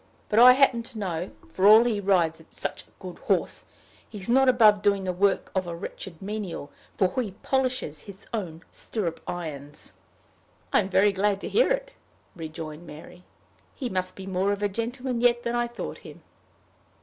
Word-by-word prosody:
"But 215 - +3
I 250 +1 +10
happen 260 -3 +3
to 235 0 -9
know, 180 -3 -3 0.2
for 190 +1 +3
all 215 +2 +9
he 230 -4 0
rides 170 -5 +1
such - - -5
a - - -29
good - - -9
horse, - - -1 0.4
he's 200 -4 -5
not 265 +2 +5
above 215 -5 +5
doing 200 -1 +2
the 185 -1 -2
work 195 +2 +1
of 185 -2 -1
a 170 - -4
wretched 170 -1 -8
menial, 195 -8 -5 0.3
for 195 +7 +1
he 210 -6 -5
polishes 255 - -1
his 195 0 -12
own 170 -7 -4
stirrup 180 -8 -4
irons." 150 -4 -6 0.8
"I'm 200 -2 +3
very 195 +2 +4
glad 200 +1 0
to - - -4
hear - - +3
it," - - -1 0.4
rejoined 160 -1 -7
Mary. 160 +4 -12 0.5
"He 255 -4 -4
must 185 -2 -2
be 190 - -9
more 190 +1 0
of 205 0 -2
a 205 - +2
gentleman 240 +3 -3
yet 240 0 +3
than 235 - -2
I 240 0 +1
thought 235 0 -7
him." - - -13
200 Hz, 175 wpm, -26 LUFS, 180-235 Hz, 0.8 s, I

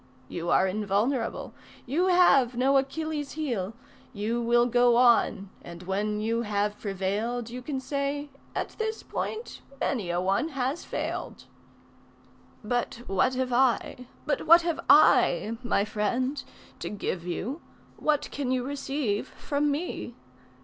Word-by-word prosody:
You 170 0 -4
are 190 - +4
invulnerable, 215 +5 -1 0.3
you 320 +9 +1
have 275 -10 +5
no 270 +2 +3
Achilles' 295 +1 -2
heel. 235 -11 -2 0.4
You 225 +3 -1
will 240 +1 +4
go 245 0 +4
on, 235 -5 +3
and 170 +1 -10
when 205 +3 -1
you 230 +2 0
have 210 -1 -1
prevailed 210 +4 -2
You 250 +1 -6
can 270 +1 -3
say: 280 +1 -3 0.2
at - - -2
this 440 0 -2
point 445 +2 -5 0.2
many 215 -10 -1
a 175 0 0
one 195 - +1
has 265 +5 -1
failed. - - -4 1.2
But 240 +1 -2
what 225 +6 +1
have 255 -1 -1
I, 250 0 +1 0.2
but 295 - -1
what 335 +2 +8
have 335 -2 -1
I, 225 +2 +5
my 225 -5 +1
friend, 245 +6 -1 0.4
To - - -4
give 185 -4 -4
you, 240 - -3 0.3
what 300 -1 0
can 275 -3 -3
you 255 -1 +1
receive 275 -5 -2
from 290 0 -1
me? 285 -5 -3
245 Hz, 135 wpm, -27 LUFS, 210-280 Hz, 1.2 s, what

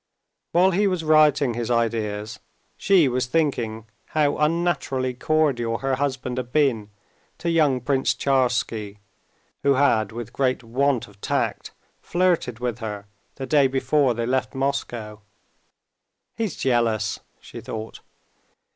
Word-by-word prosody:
While 185 +2 +4
he 200 +3 +2
was 185 -4 -1
writing 150 -4 +4
his 120 0 -3
ideas 110 -3 -1 0.4
she 190 -7 +4
was 125 0 -1
thinking 120 -7 -1 0.3
how 145 -2 +3
unnaturally 150 -5 0
cordial 125 -5 0
her 135 +2 -1
husband 130 -2 -2
had 125 -1 -4
been 125 -9 +1 0.5
to 170 - -2
young 150 -6 +3
Prince 130 -2 +1
Tcharsky, 120 -6 0 0.6
who 140 -1 +3
had, 115 -7 +2
with 120 0 -7
great 130 -2 0
want 130 +2 0
of 100 0 -20
tact, - - -1 0.3
flirted 175 -9 0
with 120 -1 -3
her 105 -2 -5 0.3
the 135 - -5
day 140 -1 +4
before 135 -1 +1
they 115 0 -2
left 130 +2 -1
Moscow. 120 -6 -3 1.2
"He's 220 -7 -2
jealous," 115 -5 0 0.2
she - - -10
thought. 110 0 -7
130 Hz, 130 wpm, -23 LUFS, 115-145 Hz, 1.2 s, While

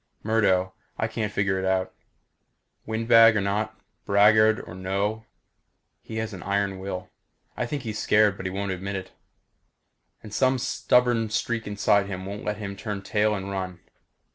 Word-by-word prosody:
Murdo 95 -4 +2 0.2
I 110 - 0
can't 110 -1 -3
figure 95 -2 0
out. 95 0 0 0.9
Windbag 115 0 +5
or - - +3
not 105 +2 -2 0.2
braggart 105 +2 +4
or - - -8
no 100 +4 -2 0.8
he 110 - -9
has 110 -1 -3
an 95 - -8
iron 100 -1 -1
will. 95 -1 -6 0.4
I 120 - -2
think 140 +1 -4
he's 110 -2 -4
scared 105 -1 +4
but 95 - -5
he - - -1
won't 100 +1 -3
admit 95 +2 -4
it. 95 -1 -6 1.1
And 105 - -10
some 130 +2 +2
stubborn 120 -2 +2
streak 115 0 -2
inside 105 -1 +2
him 95 -1 -5
won't 100 +2 -6
let 105 -1 -2
him 100 -2 -5
turn 100 -1 -5
tail 105 +1 +1
and 95 0 -5
run. 95 -2 -4
105 Hz, 160 wpm, -25 LUFS, 95-110 Hz, 1.1 s, Windbag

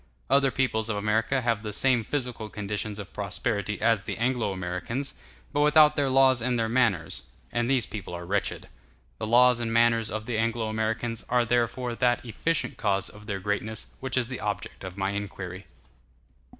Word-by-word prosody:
Other 140 -1 +5
peoples 115 -4 0
of 105 - -1
America 110 +5 +1
have 115 -3 0
the 105 -1 -5
same 125 +2 +4
physical 125 -4 -3
conditions 105 0 -4
of 105 -1 -8
prosperity 105 0 -2
as 115 -4 +3
the - - -5
Anglo 120 -3 0
Americans, 95 +9 -3 0.4
but - - +1
without 150 0 +6
their 140 -2 +1
laws 130 -2 +5
and 125 +1 0
their 115 -1 +1
manners; 110 -9 +1 0.3
and 120 0 0
these 130 -5 +2
peoples 95 -4 -6
are 85 0 -6
wretched. 100 +2 -1 0.5
The - - -3
laws 125 +1 +5
and 115 -1 -2
manners 115 -1 +3
of 110 +1 -4
the 115 -2 -1
Anglo 115 0 0
Americans 110 +1 -1
are 125 -1 +3
therefore 120 +1 0
that 120 +1 +1
efficient 165 +8 -1
cause 100 -2 +1
of 105 0 -13
their 100 -3 -2
greatness 105 +2 -3
which 130 -1 -3
is 120 -3 +1
the 125 -1 -5
object 105 -1 -4
of 95 0 -7
my 95 0 0
inquiry. 100 -2 -6
115 Hz, 180 wpm, -27 LUFS, 105-125 Hz, 0.5 s, without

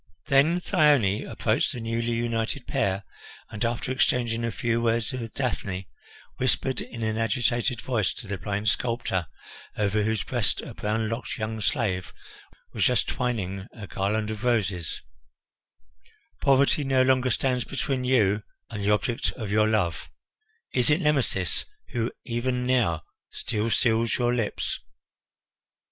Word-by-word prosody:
Then 145 +6 +5
Thyone 140 - +3
approached - - +1
the 125 - -5
newly 115 +1 -1
united 115 +2 -1
pair 95 +1 0 0.5
and, 110 0 -3
after 120 +2 -1
exchanging 120 -3 +1
a 115 - 0
few 115 +2 0
words 115 -1 +1
with 115 -3 -5
Daphne, 100 - -2 0.5
whispered 130 0 0
in 115 -1 -6
an 110 0 0
agitated 120 +2 +1
voice 115 -7 0
to - - -8
the 100 -2 -4
blind 100 +2 -2
sculptor, 115 -6 0 0.5
over 105 0 +2
whose 110 -2 0
breast - - 0
a - - -8
brown 110 +1 -1
locked 115 +2 -4
young 110 0 -3
slave 100 -8 0 0.6
was - - 0
just - - +2
twining 100 -6 -2
a 110 -4 -8
garland 105 +3 -1
of 110 +1 -6
roses: 100 -8 0 1.4
"Poverty 140 +2 +4
no 135 -1 +3
longer 130 0 +3
stands 125 0 +1
between 135 0 -2
you 105 -5 +3 0.3
and 105 -3 -4
the 100 - +1
object 110 +3 +1
of 110 -5 -5
your 110 +1 +4
love; 100 -7 0 0.6
is 125 +1 +3
it 150 +3 +4
Nemesis 140 - +1 0.2
who 115 0 -1
even 125 +1 -1
now 115 - +2 0.3
still 110 0 -2
seals 115 0 +2
your 120 -1 +2
lips?" 120 -4 -1
115 Hz, 140 wpm, -26 LUFS, 105-125 Hz, 1.4 s, Then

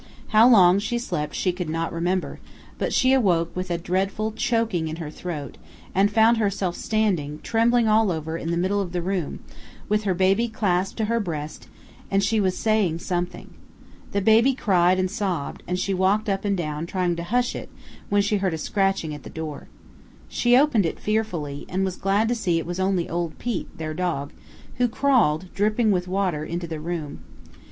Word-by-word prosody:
How 220 +3 +6
long 190 -5 +6
she 240 +4 -2
slept 150 -11 -3
she 185 - +1
could 180 -2 -5
not 165 +1 -2
remember, 175 +2 -1 0.4
but - - -1
she 260 0 +3
awoke 175 -10 +2
with 185 0 -3
a 170 - 0
dreadful 195 +5 -1
choking 225 -6 0
in 155 - -4
her 160 -3 -6
throat, 155 -6 -6 0.3
and 195 +2 +3
found 225 +2 +4
herself 200 -4 -1
standing, 180 -10 -1
trembling 230 +1 +2
all 215 -2 +4
over, 160 -1 -3
in 165 0 -4
the 170 - 0
middle 190 +3 +1
of 180 -2 -5
the 175 - -1
room, 180 -4 -3 0.5
with 210 0 0
her 190 -2 +1
baby 195 +6 +2
clasped 195 -4 -1
to 220 - 0
her 230 +2 0
breast, 155 -7 -5 0.4
and 195 0 +2
she 220 +2 +2
was 185 -2 +1
"saying 215 -7 +1
something." 175 +1 -4 0.6
The 200 - 0
baby 225 +6 +4
cried 185 -6 +3
and 185 - +1
sobbed, 185 -8 -3
and 180 - -1
she 195 +1 -1
walked 190 +4 +1
up 195 0 -1
and 200 -1 +1
down 155 -1 -3
trying 180 -1 0
to 170 - -4
hush 245 +7 0
it - - -7 0.4
when 205 0 +3
she 210 +1 +1
heard 190 -4 0
a - - -4
scratching 195 -2 0
at 145 - -8
the - - -10
door. 155 -3 -6 0.6
She 245 0 +3
opened 255 - +3
it - - -5
fearfully, 175 -10 -2
and 190 +2 0
was 185 -1 -3
glad 200 +4 +1
to - - +2
see 185 -8 0
it 165 - -2
was 175 +2 -4
only 190 -2 +1
old 170 -1 -3
Pete, 240 -6 -4
their 155 -1 -4
dog, 160 -5 -2 0.4
who 250 0 +3
crawled, 220 - +1
dripping 215 +2 +2
with 180 -2 0
water, 185 -5 -1
into 170 +2 -4
the 160 -2 -5
room. 155 - -5
190 Hz, 195 wpm, -24 LUFS, 170-215 Hz, 0.6 s, How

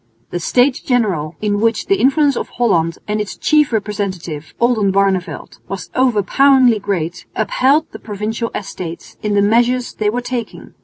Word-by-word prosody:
The 175 - -2
States 250 +9 +2
General, 190 - 0
in 205 -1 0
which 230 -1 +1
the 395 - +2
influence 280 +1 +3
of - - -4
Holland 170 -9 +1
and 210 0 -1
its 210 - -6
chief 300 -3 +3
representative, 195 -8 -4
Oldenbarneveldt, 195 -7 0
was 195 -1 -6
overpoweringly 255 +1 +4
great, 180 -4 -3
upheld 265 +8 +2
the - - -9
Provincial 220 +2 -4
Estates 180 -4 -7
in 210 -1 -1
the 200 - +4
measures 240 +4 +2
they 210 -1 0
were 245 +3 -2
taking. 245 -2 -6
210 Hz, 150 wpm, -17 LUFS, 195-245 Hz, -, overpoweringly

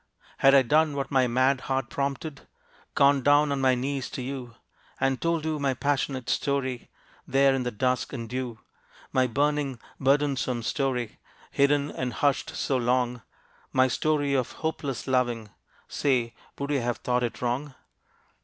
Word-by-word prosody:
Had 135 +1 +6
I 135 - +7
done 150 +3 +3
what 140 -1 -3
my 130 -2 +3
mad 130 +2 +2
heart 135 -2 -2
prompted 140 +1 -3 0.5
Gone 140 0 +5
down 145 +2 +4
on 140 -1 -1
my 130 -1 +4
knees 135 +1 -3
to 130 - -5
you, 125 -3 -6 0.4
And 135 -1 0
told 165 -2 0
you 155 -1 -1
my 135 -2 0
passionate 135 -2 -1
story 130 -3 -1 0.4
There 135 0 +4
in 135 - 0
the 125 - -1
dusk 125 +2 -1
and 115 -4 -5
dew; 125 -1 -4 0.5
My 130 -1 +3
burning, 140 0 0 0.2
burdensome 135 -3 +1
story, 125 -2 -2 0.3
Hidden 140 +1 +2
and 125 -1 -3
hushed 145 -1 0
so 135 - 0
long, 125 0 0 0.5
My 130 0 +4
story 145 +1 0
of 130 -3 0
hopeless 150 -5 -3
loving 120 -5 0 0.4
Say, 125 -5 0 0.2
would 140 +1 -3
you 140 -3 +1
have 120 0 -1
thought 125 0 0
it 120 -2 -3
wrong? 130 +3 -2
135 Hz, 155 wpm, -27 LUFS, 125-140 Hz, 0.5 s, I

